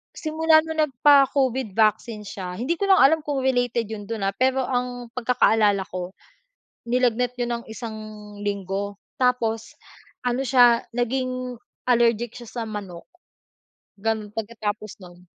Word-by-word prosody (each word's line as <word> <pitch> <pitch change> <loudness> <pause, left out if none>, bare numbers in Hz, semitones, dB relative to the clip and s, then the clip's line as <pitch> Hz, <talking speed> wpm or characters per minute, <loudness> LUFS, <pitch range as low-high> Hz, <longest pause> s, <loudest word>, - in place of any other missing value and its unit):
simula 315 0 +3
nung 320 -1 -5
nagpa-Covid 270 -5 +3
vaccine 215 0 +1
siya 185 -2 -6
hindi 275 - -2
ko 400 - 0
lang 385 - +6
alam 315 +4 +5
kung 285 -3 -3
related 245 -2 +1
yun 205 -2 -6
dun 225 -3 -4
ah, 195 - +1
pero 260 +4 +1
ang 245 -1 -3
pagkakaalala 225 -5 +2
ko, 180 +1 -5 0.8
nilagnat 250 0 +1
yun 240 -1 -2
ng - - -20
isang 225 0 -6 0.5
linggo 200 0 -3 0.2
tapos 230 -3 0 0.5
ano 245 +2 +1
siya, 245 -3 +5
naging 255 +1 -2 0.3
allergic 235 -2 +2
siya 240 -2 -10
sa 235 - -4
manok, 195 -5 -7 0.9
gano'n, 220 0 -2
pagkatapos 215 -2 -5
nun. 180 -1 -14
240 Hz, 135 wpm, -24 LUFS, 210-255 Hz, 0.9 s, lang